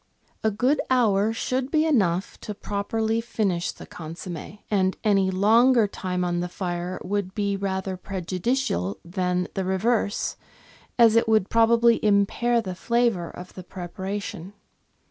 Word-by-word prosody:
A 220 - +3
good 250 +8 +1
hour 220 -5 +3
should 255 +3 -2
be 310 0 +2
enough 195 - +1
to 210 - -6
properly 220 +3 -1
finish 200 -7 -1
the - - -12
consomm^, 170 +3 -8
and 190 -2 +2
any 195 -3 +3
longer 225 +5 +4
time 180 -2 -3
on 175 0 -1
the 180 0 -3
fire 175 0 -4
would 195 -1 -2
be 200 -1 0
rather 190 -1 -3
prejudicial 185 - -2
than 180 0 -1
the 190 - -2
reverse, 205 +3 0 0.6
as 230 -2 +6
it 230 0 +3
would 215 -3 +2
probably 230 0 +4
impair 215 +3 +2
the 185 -2 -4
flavour 230 -3 0
of 180 +1 -10
the 185 - -9
prepara 190 +3 -5
tion. 190 -1 -8
200 Hz, 145 wpm, -25 LUFS, 185-225 Hz, 0.6 s, as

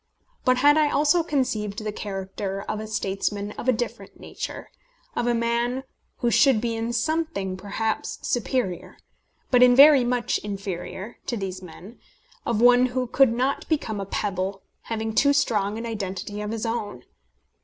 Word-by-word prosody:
But 255 0 +4
I 290 0 +8
had - - 0
also 300 +4 +3
conceived 220 -9 -1
the 215 - -2
character 195 -1 -5
of 210 - -4
a 215 - -6
statesman 205 0 -2
of 250 - -3
a - - +7
different 240 0 -5
nature - - -7 0.4
of 240 - 0
a 240 - +2
man 235 +2 0 0.4
who 240 -2 +2
should 265 -4 +5
be 230 0 -2
in 225 +1 -2
something 250 - -1
perhaps 205 +3 -3
superior, 240 -6 -2 0.5
but 250 -1 +5
in 250 0 +7
very 280 -1 +8
much 245 -1 0
inferior, 195 +1 -6
to 240 - -1
these 190 -2 -5
men 185 +5 -12 0.5
of 235 -3 +1
one 245 +1 +6
who 255 0 -2
could 260 0 +4
not 255 +4 -1
become 230 -10 -1
a 195 - -5
pebble, 195 -1 -2 0.2
having 220 -1 -3
too 280 +5 +4
strong 215 -7 +1
an 230 - -5
identity 205 -2 -4
of 210 - -4
his 225 0 -3
own. 225 -3 -3
225 Hz, 165 wpm, -25 LUFS, 205-250 Hz, 0.5 s, I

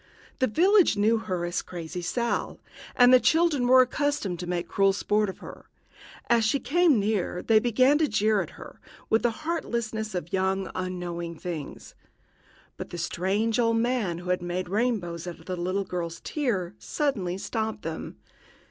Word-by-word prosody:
The 260 - +3
village 360 - +4
knew 220 +2 +3
her 185 -6 -3
as 175 0 -2
Crazy 175 0 -7
Sal, 235 +7 -2 0.4
and 245 +1 +6
the 255 - +8
children 315 -4 +2
were 255 +1 +7
accustomed 255 - -2
to 180 - -5
make 175 -1 -2
cruel 195 0 +2
sport 210 +1 +1
of 190 - -7
her. - - -11 0.6
As 235 -1 +3
she 250 +6 +2
came 330 -5 +3
near 200 -3 -1
they 220 -1 +5
began 255 +5 +3
to 315 - +3
jeer 215 -2 +2
at - - -5
her, - - -12 0.3
with 220 - +4
the 240 - +2 0.2
heartlessness 225 - -2
of 175 -2 -5
young, 190 0 0
unknowing 175 -2 -4
things. 160 -5 -7 0.8
But - - -7
the 175 - -7
strange 200 +7 0
old 230 -1 +2
man 225 -7 0
who 180 +1 -4
had 180 - 0
made 175 +1 -3
rainbows 195 -6 -1
out 175 - -6
of - - -18
the 185 - -3
little 185 +3 -1
girl's 170 -2 -4
tear 205 - -2
suddenly 200 - -2
stopped 220 +2 -3
them. 160 - -6
205 Hz, 170 wpm, -26 LUFS, 180-240 Hz, 0.8 s, the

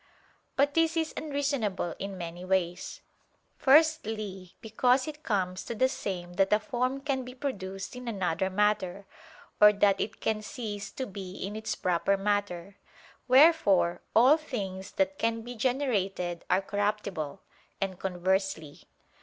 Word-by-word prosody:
But 285 +1 +2
this 330 +1 +2
is 320 -1 0
unreasonable 280 - -1
in 195 0 -5
many 175 0 -6
ways. 185 -2 -1 0.5
Firstly, 220 - +2
because 250 +4 +2
it 305 0 -7
comes 190 - -1
to 235 - -4
the 260 +4 +3
same 180 -8 -5
that 195 -1 +3
a 210 - +5
form 255 +5 -2
can 275 -2 -1
be 250 0 -9
produced 200 -7 -5
in 250 -1 -8
another 190 -4 -1
matter, 200 -1 0 0.6
or 210 0 +10
that 200 -1 +3
it 220 - -4
can 220 -1 -1
cease 210 -2 -5
to 260 - -3
be 190 -3 -8
in 200 +2 -5
its 220 0 -3
proper 180 +2 +1
matter; 200 -2 -2 0.5
wherefore 255 - +5
all 255 +7 +7
things 195 -10 -5
that 190 0 0
can 230 0 0
be 240 +2 -7
generated 210 -9 -1
are 185 +2 +3
corruptible, 200 -5 -2 0.4
and 190 -2 -3
conversely. 190 -4 -1
205 Hz, 140 wpm, -29 LUFS, 190-250 Hz, 0.6 s, or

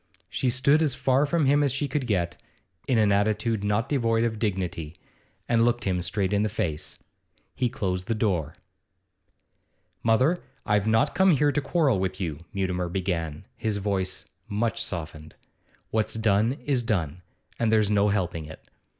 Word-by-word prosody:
She 130 - 0
stood 140 +5 +3
as 145 -5 +1
far 135 +3 +2
from 165 0 +1
him 145 +2 +4
as 140 -2 +2
she 135 +3 -1
could 135 -1 -2
get, 85 -5 0 0.5
in 130 - +2
an 105 -2 +4
attitude 105 +1 +1
not 105 +4 +1
devoid 115 -5 +1
of 110 -2 -1
dignity, 90 -7 -2 0.5
and 115 -1 +3
looked 120 0 +1
him 90 -2 0
straight 95 +3 -1
in 100 - +2
the 110 - +1
face. 80 -7 -3 0.6
He 125 -1 +1
closed 95 -7 -3
the 115 - 0
door. 90 -8 -1 1.5
'Mother, 130 +10 +3 0.2
I've 105 0 +2
not 110 0 +3
come 190 0 +4
here 150 -3 +4
to 145 - 0
quarrel 145 - +2
with 95 0 -2
you,' 80 -6 -3
Mutimer 90 -2 -1
began, 85 -3 -3
his 110 -2 -1
voice 95 -2 -2 0.2
much 110 +1 -1
softened. 80 -3 -6 0.6
'What's 110 0 0
done 110 +1 +2
is 135 -4 +2
done, 90 -8 -2 0.4
and 115 -2 +2
there's 110 -2 +3
no 105 0 +3
helping 90 -5 -1
it. 80 +1 -12
105 Hz, 165 wpm, -26 LUFS, 95-120 Hz, 1.5 s, him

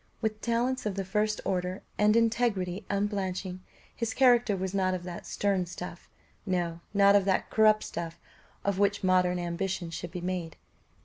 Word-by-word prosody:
With 215 -1 -2
talents 240 +1 0
of 200 - -2
the 195 -1 -2
first 210 +2 0
order, 185 -1 -2
and 210 +1 +4
integrity 220 -5 +1
unblenching, 195 -2 -2 0.4
his 230 -2 -2
character 245 -5 +4
was 190 0 -3
not 185 -1 +1
of 180 - -6
that 175 -1 -7
stern 195 -3 0
stuff 175 0 -8 0.3
no, 175 -4 -1
not 200 0 +5
of 200 -2 +4
that 190 -1 +1
corrupt 215 -1 +5
stuff 165 0 -5 0.5
of 200 -1 0
which 200 0 +2
modern 180 -1 +3
ambition 175 0 -3
should 170 +1 -5
be 180 +2 -6
made. 180 -2 -3
195 Hz, 165 wpm, -29 LUFS, 180-210 Hz, 0.5 s, not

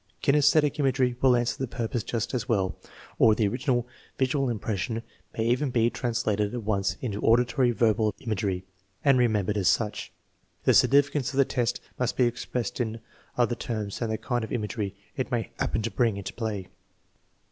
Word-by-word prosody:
Kinsesthetic 150 +1 +4
imagery 130 -3 +2
will 130 -2 +5
answer 120 0 0
the 130 - -1
purpose 120 -1 -2
just 115 +1 -3
as 120 -5 -2
well, 95 -5 +1 0.4
or 110 -1 +6
the 105 -2 +2
original 125 +2 0 0.3
visual 135 0 +1
impression 110 0 -2 0.3
may 110 - 0
even 125 +4 +1
be 120 -1 +2
trans 120 -1 -2
lated 105 +1 0
at 120 - -4
once 100 -2 0
into 105 -5 -3
auditory 125 +2 +3
verbal 110 -1 +2
imagery 95 -5 -2 0.4
and 135 -3 +5
remembered 105 -4 +1
as 95 - +1
such. 105 -3 0 0.5
The - - +4
significance 140 -1 +4
of - - -5
the 140 - +5
test 120 -2 -1 0.2
must 125 0 -1
be 125 - +4
expressed 120 +1 -2
in 115 -1 -3 0.4
other 120 -1 +2
terms 110 -4 -4
than 115 - -2
the 110 - -1
kind 120 -1 -2
of 110 - -6
imagery 105 -3 -3 0.2
it 130 - -2
may 120 -2 -1
happen 110 - 0
to 115 - -2
bring 115 -5 +1
into 100 - -6
play. 105 -5 -4
120 Hz, 180 wpm, -27 LUFS, 110-125 Hz, 0.5 s, or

